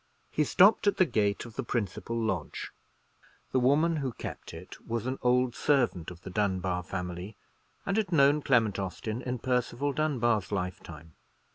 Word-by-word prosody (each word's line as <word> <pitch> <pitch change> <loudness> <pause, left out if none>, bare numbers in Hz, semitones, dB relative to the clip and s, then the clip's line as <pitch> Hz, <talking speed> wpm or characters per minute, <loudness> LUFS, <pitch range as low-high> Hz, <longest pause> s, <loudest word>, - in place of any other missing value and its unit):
He 150 - +2
stopped 195 +8 +5
at 205 - +3
the 185 - +5
gate 105 -8 0
of 115 -2 -11
the - - 0
principal 115 0 -2
lodge. 95 -8 -3 0.8
The 130 - +2
woman 155 +6 +3
who 135 -4 -2
kept - - -7
it 80 +3 -11
was 115 0 -2
an 130 +1 -3
old 125 0 +2
servant 125 - +1
of 85 -1 -11
the 95 - -7
Dunbar 95 -3 0
family, 90 +3 -6 0.5
and 195 +1 0
had 210 -4 0
known 145 -1 +5
Clement 115 -8 +2
Austin 100 +5 -4
in 125 0 -3
Percival 125 +3 -1
Dunbar's 120 -10 +1
lifetime. 90 -5 -5
115 Hz, 160 wpm, -29 LUFS, 95-135 Hz, 0.8 s, stopped